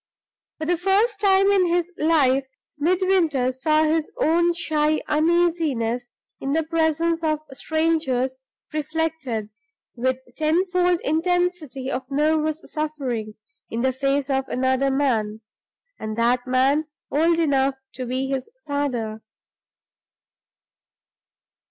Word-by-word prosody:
For 315 - -4
the 350 +2 +1
first 400 +4 +2
time 390 -1 +4
in 380 -3 +3
his 345 0 0
life, 275 -4 +2 0.3
Midwinter 335 -6 +2
saw 305 +4 +2
his 315 0 0
own 340 +2 +3
shy 310 -2 +1
uneasiness 305 -7 +1 0.3
in 275 +1 -2
the 320 +1 +2
presence 330 +1 0
of 310 -1 0
strangers 270 -5 0 0.3
reflected, 305 -8 -2 0.4
with 255 +1 0 0.2
tenfold 355 +2 +1
intensity 325 -4 -1
of 260 0 -4
nervous 310 +2 +1
suffering, 265 -9 -3 0.3
in 230 - -3
the 260 +1 +1
face 275 +1 0
of 265 0 0
another 260 +1 +1
man 225 -6 0 0.6
and 215 0 -5
that 245 +2 +1
man 270 +4 +2 0.3
old 330 +3 +3
enough 275 -4 +2 0.2
to 250 +1 -5
be 255 +2 -1
his 265 -1 -3 0.2
father. 245 -7 -2
300 Hz, 110 wpm, -23 LUFS, 260-330 Hz, 0.6 s, time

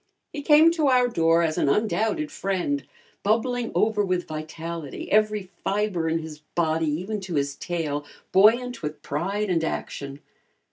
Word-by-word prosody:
He 295 - -4
came 305 +3 +6
to 320 -3 +1
our 250 -2 +4
door 165 -6 +3
as 160 -1 0
an - - +2
undoubted 210 -3 0
friend, 175 -7 -1 0.4
bubbling 235 +3 0
over 215 -1 +2
with 185 -2 -1
vitality, 160 0 -6
every 210 -3 +2
fiber 195 -5 0
in 165 - +1
his 160 -2 -7 0.2
body, 160 -1 +1
even 190 +8 -3
to 185 -3 -5
his 140 -1 0
tail, 155 -4 -3 0.3
buoyant 235 +5 +4
with 150 -1 -5
pride 195 +7 -2
and 165 -2 +1
action. 140 -3 -4
180 Hz, 150 wpm, -25 LUFS, 160-215 Hz, 0.4 s, came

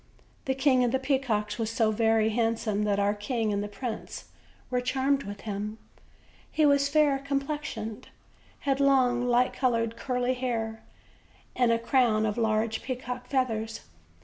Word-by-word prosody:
The 265 - 0
King 265 -2 +3
of 240 - +1
the 265 - +2
Peacocks 260 -6 -1
was 225 -1 -1
so 225 -1 +2
very 220 0 +2
handsome 220 -2 0
that 205 -1 +1
our 200 0 +2
king 215 +1 -1
and 200 0 -1
the - - -4
prince 220 +2 -6 0.5
were 250 0 +1
charmed 270 +2 +1
with 205 0 -7
him; 210 0 -4 0.7
he 310 - +3
was 280 -1 +4
fair 290 -2 +3
complex 280 +2 -3
ioned, 220 -1 -6 0.6
had 275 -1 0
long 255 -3 +3
light 245 +1 +3
colored 230 -3 0
curling 250 0 -1
hair, 230 -3 -3 0.7
and 245 -2 +3
a 230 - +3
crown 230 -2 +2
of 210 -1 -1
large 220 -1 0
peacocks' 250 -1 -5
feathers. 225 -5 -1
240 Hz, 155 wpm, -28 LUFS, 220-265 Hz, 0.7 s, was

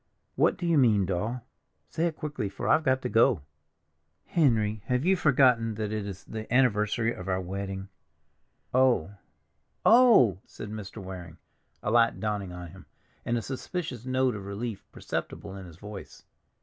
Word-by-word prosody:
"What - - +2
do 180 - -4
you 165 -3 +4
mean, 105 -7 +4
Doll? 105 +7 -2 0.5
Say 170 +1 +1
it 165 - -4
quickly, 150 -10 -3
for 95 - -5
I've 160 - +4
got 130 -2 +1
to - - 0
go." 115 - +3 0.8
"Henry, 110 -9 +2
have 125 +4 0
you 190 +1 +4
forgotten 125 - +3
that 105 -1 -3
it 105 -2 -3
is 95 -2 -7
the 110 0 -7
anniversary 115 -2 +2
of 90 - -9
our 95 0 +1
wedding?" 95 +1 -5 0.9
"Oh—oh!" 125 - +3
said 105 - -8
Mr. 105 -1 -7
Waring, 90 -3 -8 0.5
a 100 - 0
light 115 0 +3
dawning 105 -3 -2
on 90 -1 -8
him, - - -14 0.4
and 120 - 0
a 115 - -3
suspicious 135 -2 -5
note 130 0 +1
of 100 -2 -7
relief 105 +1 -5
perceptible 100 -1 -5
in 95 -2 -9
his 85 -2 -13
voice. 105 +1 -10
110 Hz, 160 wpm, -28 LUFS, 100-130 Hz, 0.9 s, you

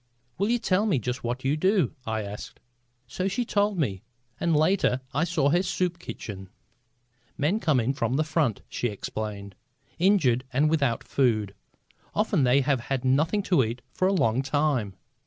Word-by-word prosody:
"Will 200 +2 +1
you 240 - +3
tell 205 -2 +1
me 185 -9 +2
just 125 +1 -3
what 120 +2 -3
you 140 +3 +2
do?" 185 +4 +2
I 110 -1 -1
asked. 100 +1 -8 0.5
So 185 - -3
she 240 +5 -1
told 205 -2 +1
me, 100 - -1 0.4
and 170 -2 +1
later 155 -5 +2
I 150 +4 +1
saw 160 -5 +1
her 175 +4 +3
soup 180 -2 -1
kitchen. 95 - -8 0.9
"Men 165 +10 +1
come 155 -10 +2
in 120 +3 0
from 130 -1 -1
the 155 - +2
front," 155 - 0
she 120 - -2
explained, 100 -1 -5 0.5
"injured 160 - +3
and 145 +4 +2
without 140 -7 +1
food. 110 -7 +1 0.6
Often 135 - +2
they 125 +3 +4
have 135 -1 +1
had 135 -1 -1
nothing 160 +10 +2
to 175 -8 +3
eat 115 +2 -4
for 185 - +1
a - - +2
long 120 - +2
time. 135 -8 0
140 Hz, 175 wpm, -26 LUFS, 120-180 Hz, 0.9 s, they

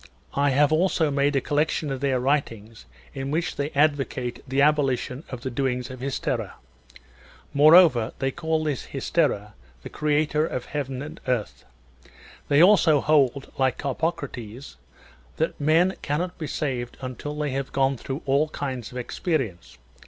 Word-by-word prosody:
I 140 +1 +2
have 145 +2 +3
also 160 -2 +2
made 140 +1 +1
a 135 - +2
collection 150 0 0
of 135 - -3
their 135 -2 +1
writings 115 -5 -2 0.3
in 135 0 -4
which 165 +3 -1
they 145 +1 -2
advocate 140 -4 0
the 135 +1 -1
abolition 140 -2 +1
of 125 -2 -7
the 130 - -4
doings 125 -1 -2
of 130 - -9
Hystera.^ 135 +1 -3 1.0
More 150 +3 +7
over, 130 -11 +5
they 135 0 -1
call 160 +2 -1
this 150 -4 -3
Hystera 130 -7 -1 0.3
the - - -7
creator 150 0 +1
of 130 -6 -3
heaven 135 -2 -4
and 150 - -9
earth. 125 -5 -2 0.8
They 145 +3 +5
also 175 -6 +5
hold, 140 -2 +2
like 130 -1 +2
Carpocrates, 135 - -4 0.6
that 160 -1 -2
men 165 +5 +3
cannot 170 +5 -2
be 155 - -4
saved 130 -4 -3
until 135 +3 -6
they 150 -2 -1
have 135 0 -3
gone 135 0 +2
through 135 +3 -6
all 140 +3 +2
kinds 130 -6 -5
of 125 - -8
experience. 125 - -3
140 Hz, 150 wpm, -25 LUFS, 130-150 Hz, 1.0 s, More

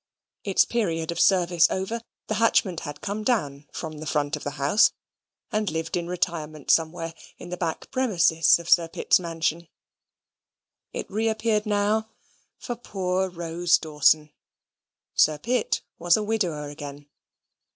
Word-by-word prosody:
Its 195 -2 +3
period 170 -9 -1
of 170 - -4
service 175 -3 +4
over, 195 +5 -3 0.2
the - - -2
hatchment 190 -6 +3
had 145 -1 -7
come 210 +1 -3
down 150 - -1
from 155 -2 -6
the 155 - -7
front 150 0 0
of 150 - -8
the 145 +1 -5
house, 145 +10 +4 0.6
and 215 -1 0
lived 160 0 -3
in 170 -1 -2
retirement 160 -4 -2
somewhere 165 0 +1 0.2
in 175 - -10
the 180 - -3
back 170 -3 -4
premises 180 -10 +4
of 170 -1 -10
Sir 170 -1 +5
Pitt's 165 - +2
mansion. 165 -1 -2 1.2
It - - -5
reappeared 220 0 0
now 210 +1 +1 0.5
for 240 - -5
poor 190 -4 -2
Rose 175 0 +1
Dawson. 150 0 +2 0.8
Sir 155 0 +4
Pitt 245 +10 -1 0.2
was 175 +2 +4
a 215 - -1
widower 180 -9 -1
again. 145 0 -9
170 Hz, 140 wpm, -25 LUFS, 155-205 Hz, 1.2 s, Sir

